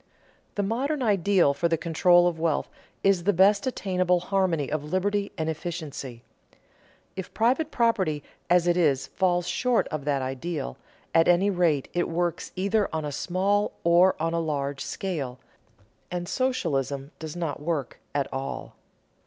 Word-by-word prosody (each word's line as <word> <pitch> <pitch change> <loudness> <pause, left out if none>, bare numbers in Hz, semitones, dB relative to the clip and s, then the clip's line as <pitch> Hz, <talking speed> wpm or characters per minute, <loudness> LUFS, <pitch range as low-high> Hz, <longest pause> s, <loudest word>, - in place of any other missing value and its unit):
The 205 - 0
modern 260 +7 -1
ideal 195 -7 +3
for 170 +4 0
the 165 -1 +1
control 175 +2 +4
of 170 -2 -2
wealth 160 -2 0 0.4
is 195 -3 +3
the 205 - +4
best 200 +5 +4
attainable 185 -6 +1
harmony 180 -5 0
of 155 -1 -1
liberty 200 +5 -1
and 160 - -1
efficiency. 155 -7 -5 0.9
If 190 - -6
private 260 +7 +2
property 200 - +1 0.3
as 175 0 +4
it 175 0 +2
is, 145 -6 +2
falls 180 -2 0
short 250 -2 +1
of 155 -3 -4
that 140 -2 0
ideal, 135 - -4 0.4
at 165 0 +5
any 180 +3 +4
rate 170 -7 +1
it 175 - 0
works 170 0 -2
either 200 +2 +1
on 160 -1 -2
a 145 - -3
small 195 +7 0
or 175 +2 +5
on 165 +1 0
a 170 - +1
large 140 -4 -2
scale, 145 -10 -4 0.7
and 175 -1 -4
socialism 145 - -1
does 160 0 -6
not 165 -5 -3
work 150 -5 -3 0.2
at 140 -2 +1
all. 135 +1 -5
175 Hz, 155 wpm, -26 LUFS, 150-195 Hz, 0.9 s, at